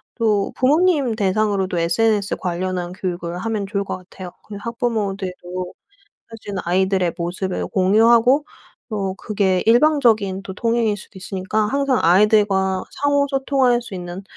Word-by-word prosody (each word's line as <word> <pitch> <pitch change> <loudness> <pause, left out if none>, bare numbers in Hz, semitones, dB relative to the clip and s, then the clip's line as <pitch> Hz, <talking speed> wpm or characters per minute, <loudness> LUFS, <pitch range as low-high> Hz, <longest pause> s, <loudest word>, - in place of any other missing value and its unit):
또 210 -4 +1
부모님 290 -2 +2
대상으로도 200 -2 0
SNS 205 +5 +1
관련한 180 0 -3
교육을 175 -2 -4
하면 215 0 -2
좋을 200 0 -2
것 195 - -5
같아요. 185 0 -11 0.2
그 210 - -8
학부모들도 195 -6 -3 0.6
사실 220 -3 -8
아이들의 185 0 +1
모습을 180 +2 -3
공유하고 230 +8 +4 0.5
또 195 -3 -2
그게 195 -2 0
일방적인 230 -7 +3
또 190 - -7
통행일 230 -1 0
수도 195 0 -12
있으니까 190 +3 -3
항상 275 +2 +1
아이들과 190 +1 +3
상호 285 0 +1
소통할 270 -3 +2
수 230 -4 -9
있는 180 +1 -7
200 Hz, 320 characters per minute, -20 LUFS, 185-230 Hz, 0.6 s, 공유하고